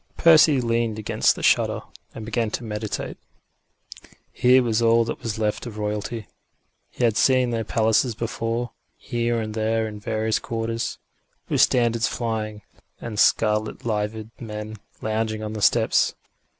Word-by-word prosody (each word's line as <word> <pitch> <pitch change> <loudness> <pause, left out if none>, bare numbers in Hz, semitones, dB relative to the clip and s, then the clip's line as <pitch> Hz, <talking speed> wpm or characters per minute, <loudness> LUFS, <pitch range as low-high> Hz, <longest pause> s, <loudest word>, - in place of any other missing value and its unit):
Percy 155 -4 +6
leaned 115 -2 0
against 110 - +1
the - - -8
shutter, - - +3 0.3
and 110 - -7
began 115 0 -1
to 120 - -4
meditate. 105 -1 -4 1.1
Here 125 +1 +4
was 115 -1 +1
all 115 0 +4
that - - -5
was 110 -2 -3
left 110 +2 -1
of 110 -2 -8
Royalty. 105 +1 -3 0.6
He - - -5
had 115 -3 +3
seen 130 0 +3
their 115 -1 -1
palaces 110 +2 +1
before, 115 0 -3 0.3
here 120 0 -1
and 110 -1 -4
there 110 0 0
in 105 -1 -8
the - - -20
various 110 0 0
quarters, 115 0 -3 0.5
with - - +2
standards 115 -2 +3
flying, 110 -2 -3 0.4
and 110 -3 -5
scarlet 105 +1 +2
liveried 110 0 -2
men 110 -1 -6 0.3
lounging 110 0 -1
on 105 0 -4
the 105 - -5
steps. 95 - +3
110 Hz, 150 wpm, -23 LUFS, 110-115 Hz, 1.1 s, Percy